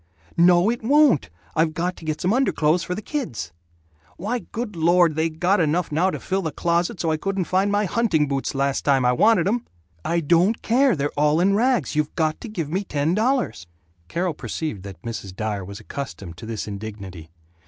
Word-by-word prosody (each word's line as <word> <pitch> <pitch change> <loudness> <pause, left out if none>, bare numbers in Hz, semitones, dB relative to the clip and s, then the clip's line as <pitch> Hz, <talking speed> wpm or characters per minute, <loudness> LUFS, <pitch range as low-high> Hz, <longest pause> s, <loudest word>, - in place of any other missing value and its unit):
"No, 175 +4 +5
it 240 - -4
won't! 280 - +4 0.3
I've 160 0 +1
got 180 +2 -1
to 165 - -11
get 155 -1 -2
some 185 +4 +2
underclothes 175 - +2
for 180 - -3
the 210 - -6
kids." 270 - -4 0.7
"Why, 230 +7 -2
good 225 -3 -4
Lord, 170 0 +4
they 160 +2 0
got 180 +5 +1
enough 165 +1 +1
now 170 +5 +2
to - - -4
fill 190 +1 -1
the 160 -4 -3
closet 170 +2 0
so 160 0 0
I 155 - +1
couldn't 195 +3 -1
find 190 +3 +1
my 205 +1 +2
hunting 180 -7 +1
boots, 135 0 -2
last 140 0 0
time 135 -3 +3
I 125 - +4
wanted 200 - +4
them." 230 +5 0 0.4
"I 170 +1 +1
don't 175 +7 +2
care. 250 0 +3
They're 145 -1 -1
all 150 +2 +3
in 190 +3 +3
rags. 230 - +1
You 150 -1 +2
got 155 -3 0
to 235 - -7
give 165 -8 -4
me 190 +4 0
ten 150 -2 0
dollars 225 - 0 0.2
" 85 0 -38
Carol 175 - -1
perceived 120 - -4
that 95 -3 -9
Mrs. 110 -5 -6
Dyer 105 -1 -3
was 100 +2 -8
accustomed 100 -11 -7
to 110 - -9
this 110 -2 -4
indignity. 100 -5 -8
165 Hz, 205 wpm, -23 LUFS, 140-195 Hz, 0.7 s, No